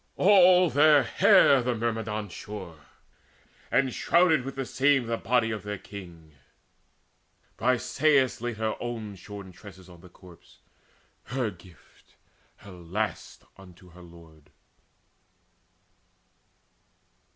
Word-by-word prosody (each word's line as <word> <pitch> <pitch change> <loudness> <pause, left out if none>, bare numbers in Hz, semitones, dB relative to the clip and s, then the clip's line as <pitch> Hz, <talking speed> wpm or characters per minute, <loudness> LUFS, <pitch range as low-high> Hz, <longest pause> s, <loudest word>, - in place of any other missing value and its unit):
All 185 -3 +5
their 145 -1 +5
hair 135 +2 +4
The 125 0 -2
Myrmidons 110 -3 -4
shore, 90 -8 -10 0.8
and 135 -2 +1
shrouded 165 -6 +2
with 135 +1 -7
the 135 0 -4
same 135 0 +1
The 115 0 -2
body 115 0 0
of 110 - -5
their 105 0 -6
king. 85 -6 -12 1.3
Briseis 130 0 +1
laid 120 -2 -4
Her 110 0 -2
own 115 -4 -6
shorn 100 0 -11
tresses 95 -1 -15
on 85 -1 -16
the 90 - -16
corpse, 90 -1 -19 0.7
her 120 -2 -3
gift, 90 -2 -21 0.4
Her 100 - -15
last, 90 +3 -5
unto 90 -2 -17
her 90 +2 -16
lord. 80 -3 -17
110 Hz, 110 wpm, -26 LUFS, 90-130 Hz, 1.3 s, All